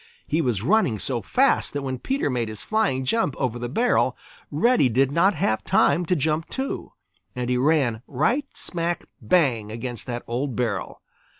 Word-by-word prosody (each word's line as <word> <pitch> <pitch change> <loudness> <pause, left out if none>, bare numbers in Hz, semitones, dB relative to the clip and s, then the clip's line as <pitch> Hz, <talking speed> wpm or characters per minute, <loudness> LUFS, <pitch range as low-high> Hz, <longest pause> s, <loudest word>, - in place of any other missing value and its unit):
He 160 - 0
was 120 -8 -1
running 175 - +3
so 120 +3 -2
fast 270 +2 +2
that 145 -1 -3
when 130 -2 -3
Peter 270 - -1
made 120 -3 -1
his 110 -1 -7
flying 205 -13 0
jump 155 - +1
over 120 -2 -1
the 120 0 -4
barrel, 235 - +2 0.3
Reddy 235 - +3
did 135 +3 +2
not 180 +6 +3
have 110 -7 0
time 165 +4 +3
to 180 - +2
jump 155 +1 -1
too, 270 +1 -4 0.4
and 125 0 -2
he 125 - +2
ran 130 -5 +2
right 240 - 0
smack 170 0 -3 0.2
bang 125 -12 +2
against 120 0 -6
that 120 -1 -4
old 125 +2 -2
barrel. 110 -6 -3
135 Hz, 175 wpm, -24 LUFS, 120-175 Hz, 0.4 s, running